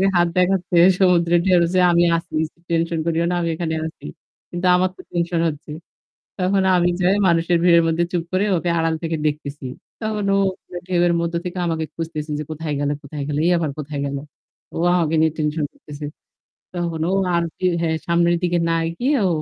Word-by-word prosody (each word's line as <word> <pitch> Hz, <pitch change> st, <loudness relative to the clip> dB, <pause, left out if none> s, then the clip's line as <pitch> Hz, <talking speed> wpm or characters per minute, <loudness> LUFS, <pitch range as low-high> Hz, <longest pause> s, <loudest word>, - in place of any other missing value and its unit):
হাত 175 Hz, 0 st, +4 dB
দেখাচ্ছে 180 Hz, 0 st, +2 dB, 0.2 s
সমুদ্রের 175 Hz, -2 st, +3 dB
ঢেউ 185 Hz, -2 st, +5 dB
যে 185 Hz, -, +3 dB
আমি 170 Hz, 0 st, +4 dB
আছি। 165 Hz, -1 st, -7 dB, 0.3 s
টেনশন 165 Hz, 0 st, 0 dB
করিও 165 Hz, 0 st, +1 dB
না 180 Hz, -, 0 dB
আমি 170 Hz, -, -1 dB
এখানে 160 Hz, -1 st, -2 dB
আছি। 160 Hz, -, -12 dB, 0.4 s
কিন্তু 175 Hz, +1 st, -4 dB
আমার 185 Hz, +1 st, +2 dB
তো -, -, -11 dB
টেনশন 170 Hz, -1 st, -1 dB
হচ্ছে। 150 Hz, -1 st, -6 dB, 0.7 s
তখন 190 Hz, +1 st, +2 dB
আমি 175 Hz, 0 st, +3 dB
যাই 185 Hz, +3 st, +3 dB
মানুষের 170 Hz, 0 st, +2 dB
ভিড়ের 170 Hz, -1 st, +6 dB
মধ্যে 165 Hz, +1 st, +1 dB
চুপ 175 Hz, -3 st, -1 dB
করে 185 Hz, +2 st, +1 dB
ওকে 175 Hz, +1 st, -2 dB
আড়াল 165 Hz, 0 st, +1 dB
থেকে 160 Hz, -1 st, -1 dB
দেখতেছি। 145 Hz, -2 st, -4 dB, 0.4 s
তখন 215 Hz, -2 st, -2 dB
ও -, -, +3 dB, 0.5 s
ঢেউয়ের 175 Hz, -1 st, +2 dB
মধ্যে 170 Hz, 0 st, -1 dB
থেকে 180 Hz, +1 st, -5 dB
আমাকে 160 Hz, -1 st, -1 dB
খুঁজতেছে 160 Hz, -2 st, -5 dB
যে -, -, -3 dB
কোথায় 155 Hz, -1 st, -4 dB
গেল, 145 Hz, 0 st, 0 dB
কোথায় 140 Hz, 0 st, -6 dB
গেলো। 145 Hz, 0 st, -1 dB
এই 180 Hz, -, +4 dB
আবার 160 Hz, -4 st, -1 dB
কোথায় 145 Hz, -1 st, -4 dB
গেল। 140 Hz, 0 st, -3 dB, 0.6 s
ও -, -, -3 dB, 0.2 s
আমাকে 165 Hz, -2 st, +1 dB
নিয়ে 160 Hz, 0 st, +3 dB
টেনশন 150 Hz, -1 st, -1 dB
করতেছে। 150 Hz, 0 st, -9 dB, 0.7 s
তখন 170 Hz, -2 st, -3 dB
ও -, -, 0 dB, 0.2 s
আরকি 170 Hz, +2 st, -2 dB
হ্যাঁ, 160 Hz, -1 st, 0 dB
সামনের 170 Hz, 0 st, +3 dB
দিকে 175 Hz, -1 st, +1 dB
না 165 Hz, -, +2 dB, 0.2 s
গিয়ে 270 Hz, +5 st, +1 dB
ও -, -, +3 dB
170 Hz, 185 wpm, -21 LUFS, 160-175 Hz, 0.7 s, ভিড়ের